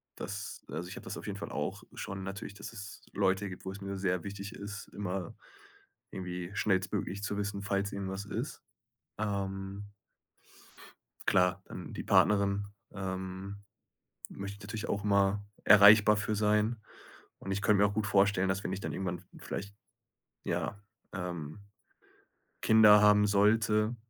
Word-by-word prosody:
das 100 +1 -6
also 90 +1 -5
ich 95 - -7
habe - - -9
das 95 - -5
auf - - -8
jeden 100 -1 -4
Fall - - -6
auch - - -3
schon 95 0 -5
natürlich, 100 +1 -6
dass 100 +2 -8
es 105 -2 -9
Leute 95 0 +1
gibt, 90 - -9
wo 95 - -3
es 95 - -9
mir 100 0 -4
sehr 90 -2 0
wichtig 100 +1 -6
ist, 105 +1 -7
immer 95 -3 -4 0.8
irgendwie 90 -1 -5
schnellstmöglich 95 0 0
zu 105 0 -2
wissen, 100 -1 -2
falls 100 0 -1
irgendwas 95 0 -4
ist, 100 - -5 0.6
ähm 100 -1 -3 1.4
Klar, 90 0 +3
dann - - -8
die - - -5
Partnerin, 100 -1 +3 0.3
ähm, 95 +1 -5 0.7
möchte 100 0 -6
ich - - -19
natürlich 105 +2 -5
auch 100 - -1
mal 100 0 +2 0.2
erreichbar 105 +1 +8
für 110 +1 -1
sein. 105 +2 +2 0.6
Und 95 - -5
ich 100 +1 -1
könnte 105 -1 +4
mir 105 - +6
auch - - -5
gut 105 -1 -1
vorstellen, 100 -1 +3
dass 95 +1 -1
wenn 95 - -2
ich 95 - -3
dann - - -4
irgendwann 90 -2 -3
v 90 - -20
vielleicht, 100 +1 -6 0.7
ja, 100 - -2 0.3
ähm, 85 -3 -5 1.0
Kinder 105 -2 +7
haben 105 0 +6
sollte, 105 +2 +3
100 Hz, 155 wpm, -31 LUFS, 95-105 Hz, 1.4 s, erreichbar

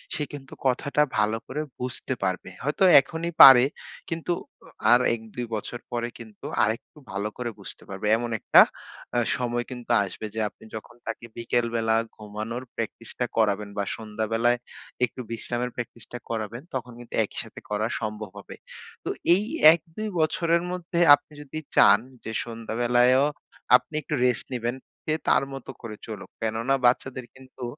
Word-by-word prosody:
সে 150 - -1
কিন্তু 135 -2 -9
কথাটা 140 +3 +1 0.2
ভালো 105 +1 +2
করে 150 - -3 0.2
বুঝতে 125 +1 -3
পারবে। 95 0 -1
হয়তো 145 +7 0 0.2
এখনই 165 +4 -3
পারে 130 -2 +11 0.5
কিন্তু 165 +1 -3 0.3
অ - - -15 0.2
আর 120 - +8 0.2
১-২ 115 +2 -7
বছর 115 +3 -5
পরে 120 0 -1
কিন্তু 110 -3 -12 0.2
আরেকটু 115 +7 -2
ভালো 100 +2 -2
করে 125 -1 -3
বুঝতে - - -9
পারবে। 95 +2 -4
এমন 120 +1 -3
একটা - - +7 0.5
অ্যা 120 - +2 0.2
সময় 120 -1 -1
কিন্তু 120 -1 -6
আসবে 100 +2 -6
যে - - -2
আপনি - - -21
যখন 110 +2 -9
তাকে 115 +1 -5
বিকেলবেলা 115 -1 +1 0.2
ঘুমানোর 110 +3 -6
প্র্যাকটিসটা 115 +2 -4
করাবেন 105 -2 +2
বা 100 - +1
সন্ধ্যাবেলায় 115 +2 0 0.5
একটু 125 +1 -9
বিশ্রামের 120 +2 -2
প্র্যাকটিসটা 120 0 -7
করাবেন 115 +1 -4
তখন 125 -1 -4
কিন্তু 120 - -12
একই - - -7
সাথে - - -11
করা 105 +1 0
সম্ভব 105 -1 -4
হবে। 100 - -10 0.5
তো - - -3 0.3
এই 195 - +1 0.3
১-২ 170 +6 -5
বছরের 170 +1 +2
মধ্যে 175 -1 -3 0.2
আপনি 150 - -21
যদি 150 +2 -6 0.2
চান 100 +1 +7 0.3
যে 110 - -4
সন্ধ্যাবেলায়ও 120 +3 +2 0.5
আপনি 125 - +1
একটু 150 - -6
রেস্ট 125 -3 +1
নিবেন, 120 0 -2 0.3
সে 155 - 0
তার - - +4
মতো 135 -1 -8
করে 115 -3 -7
চলুক। 110 -3 -8
কেননা 115 +4 +1
বাচ্চাদের 130 +1 +1
কিন্তু 130 0 -12
120 Hz, 155 wpm, -26 LUFS, 110-130 Hz, 0.5 s, পারে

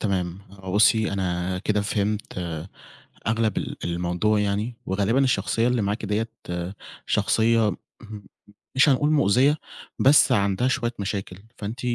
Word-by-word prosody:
تمام، 90 -4 -1
هو 95 -1 -8
بُصّي 110 0 +4
أنا 90 -1 -2
كده 105 +2 0
فهمت 105 -1 -2 0.9
أغلب 110 0 +1
ال - - -5
الموضوع 90 +5 0
يعني، 105 +4 -1
وغالبًا 105 +8 +1
الشخصيّة 115 0 +1
اللي 125 -3 +1
معاكِ 105 +2 -2
ديّة 105 +2 -1 0.8
شخصيّة 115 -1 +2
م 90 - -6 1.0
مش 135 +3 +6
هنقول 145 +2 +3
مؤذية 145 +1 +3 0.4
بس 140 0 +5
عندها 100 +2 +2
شوية 120 -2 -1
مشاكل، 95 -2 -4 0.2
فأنتِ 110 +4 -5
105 Hz, 125 wpm, -24 LUFS, 95-115 Hz, 1.0 s, مش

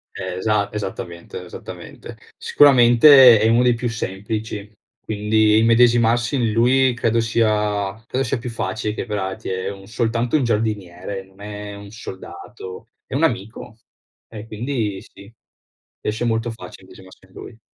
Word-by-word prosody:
Esa 100 +2 -1
esattamente, 90 -4 -6
esattamente. 90 - -10 0.2
Sicuramente 130 -2 +7
è 110 - +3
uno 115 +2 +4
dei 125 -1 +4
più 120 +1 -3
semplici, 105 0 -5 0.3
quindi 110 0 +2
immedesimarsi 115 +2 +3
in 120 -4 0
lui 125 +3 +3
credo 115 -1 0
sia 105 -3 0
credo 130 +3 -2
sia 120 +1 -1
più 120 +1 -6
facile 110 -1 -3
che 120 - -5
per 105 -1 -3
altri 95 -1 -5
è 95 +1 -3
un 95 0 -12
soltanto 115 +3 -1
un 145 - +2
giardiniere, 100 -4 -3
non 95 +1 -21
è 105 0 -7
un 100 0 -11
soldato. 95 -1 -10 0.2
È - - -6
un 150 - 0
amico, 115 -3 -3 0.5
e 110 -1 -9
quindi 110 -3 -3
sì. 100 +3 -16 0.7
Riesce 110 +3 -2
molto 115 0 -1
facile 115 -4 -11
immedesimarsi 95 0 -16
in 95 - -26
lui. 115 -1 -11
110 Hz, 145 wpm, -20 LUFS, 100-120 Hz, 0.7 s, Sicuramente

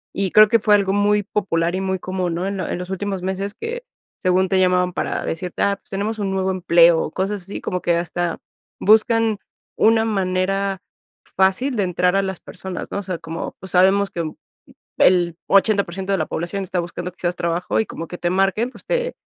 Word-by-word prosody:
y 195 -2 -1
creo 215 0 +8
que 230 +2 +3
fue 210 0 +4
algo 195 -1 +1
muy 205 0 +2
popular 175 -4 -1
y 190 - -2
muy 190 0 -1
común, 180 -2 -2
¿no? 175 +2 -2
En 200 0 -3
lo 185 - -3
en - - -3
los 180 0 -6
últimos 195 -1 -3
meses 195 +2 -3
que, 475 +2 -5 0.4
según 185 0 +2
te 190 0 +1
llamaban 180 -1 +2
para - - -2
decirte: 175 +2 -3
"Ah, 200 0 +2
pues - - -21
tenemos 210 +3 -3
un 195 -2 -1
nuevo 190 0 0
empleo". 170 -3 +4
Cosas 195 +3 -2
así 195 - -7
como 180 -1 -3
que 170 - +1
hasta 175 0 -2 0.4
buscan 220 0 +3 0.4
una 225 0 +4
manera 195 -1 -1 0.4
fácil 195 +8 +1
de 205 - +1
entrar 180 +1 +1
a 195 - +3
las 190 -2 -3
personas, 190 -1 -7
¿no? 200 - -2
O - - -6
sea, 185 -2 -4
como, 165 0 -6
pues 190 - -8
sabemos 190 +1 +4
que 170 - -3 0.8
el 175 -2 +4
80% 195 -2 +2
de 195 - +1
la 155 - -1
población 175 +4 -3
está 185 -1 -2
buscando 175 +1 -5
quizás 175 0 -3
trabajo 170 0 -1
y 220 - +1
como 165 - -7
que 175 - -7
te 175 - 0
marquen, 195 +6 +1
pues - - -15
te - - -1
190 Hz, 205 wpm, -21 LUFS, 180-200 Hz, 0.8 s, creo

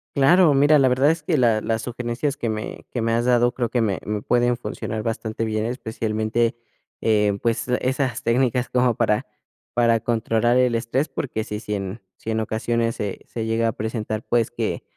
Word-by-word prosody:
Claro, 155 +3 +5
mira, 145 +2 +5
la 135 - +5
verdad 130 +4 +4
es 165 - -3
que 155 0 0
la 115 -4 +3
las 115 0 -1
sugerencias 125 +4 -2
que 115 - -3
me 110 0 -5
que 120 - -2
me 115 0 0
has 120 +1 +1
dado 120 -1 +4
creo 120 -2 -2
que 120 - 0
me 105 -4 0
me 105 0 -3
pueden 120 0 +2
funcionar 110 -2 -5
bastante 115 0 -3
bien, 110 0 -1
especialmente, 115 -1 -1 0.5
eh, 105 -2 +2
pues, 115 0 0
esas 130 0 -1
técnicas 125 +1 +1
como 125 -2 +2
para 105 - +1 0.5
para 115 -1 +3
controlar 115 +1 +1
el 125 -2 +3
estrés, 120 +6 -1
porque, 130 -5 -3
si 105 -2 -5
si 105 -1 -4
en 100 +2 -5 0.2
si 115 - -5
en 110 - 0
ocasiones 115 +1 -1
se 100 -2 -4
se 115 -2 -4
llega 115 +1 +1
a - - +1
presentar, 110 0 -4
pues, 120 -2 +2
que - - -3
115 Hz, 190 wpm, -23 LUFS, 110-125 Hz, 0.5 s, Claro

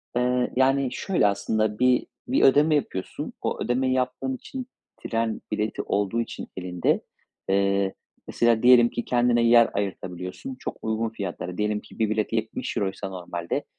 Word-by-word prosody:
Eee, 125 0 +1
yani 135 0 +3
şöyle 180 - +1
aslında 105 +1 0
bir 125 0 +3 0.2
bir 265 +3 +2
ödeme 150 +3 +5
yapıyorsun. 95 -10 -3
O - - -2
ödemeyi 130 +2 +1
yaptığın 130 +1 -1
için 255 - -7 0.3
tren 115 -1 -2
bileti 105 0 -1
olduğu 105 +3 0
için - - -6
elinde, 90 -1 0 0.5
eee, 100 0 +2 0.3
mesela 120 -1 +2
diyelim 120 -1 +7
ki 120 - -4
kendine 120 -1 +3
yer 115 0 +6
ayırtabiliyorsun 95 - -4
çok - - -5
uygun 110 +1 -1
fiyatlara. 90 -4 -5
Diyelim 105 0 0
ki - - -16
bir 110 -1 +2
bilet 110 +1 -1
€70'ysa 110 -1 -2
euroysa 95 -1 -2
normalde 85 -2 -4
115 Hz, 150 wpm, -25 LUFS, 100-125 Hz, 0.5 s, diyelim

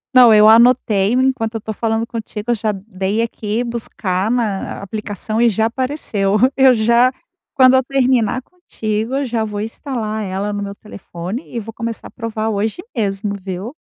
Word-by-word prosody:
Não, 250 -2 +8
eu 215 0 +7
anotei, 225 -3 +5
enquanto 255 -3 +1
eu 225 - -3
tô 220 - -5
falando 225 +1 -1
contigo 225 -1 -5
eu - - +4
já 215 -1 -1
dei 195 0 -3
aqui 220 0 -2
buscar 215 -5 -2
na 225 -5 -1
aplicação 215 +2 -4
e 240 - +5
já 220 +1 +1
apareceu, 230 -5 -1 0.2
eu 265 -1 +6
já 235 +3 +4 0.4
quando 260 -1 +6
eu 260 - +4
terminar 255 -3 +1
contigo, 225 -9 -4
eu 280 0 0
já 230 -3 -1
vou 210 -1 -4
instalar 220 -1 -4
ela 195 +2 -3
no 205 - -3
meu 200 0 -5
telefone 200 - -8
e - - 0
vou 225 +1 -8
começar 230 0 -5
a - - -22
provar 220 -1 -3
hoje 215 +1 -1 0.2
mesmo, 200 -2 -1
viu? 195 +7 -5
220 Hz, 175 wpm, -18 LUFS, 205-240 Hz, 0.4 s, Não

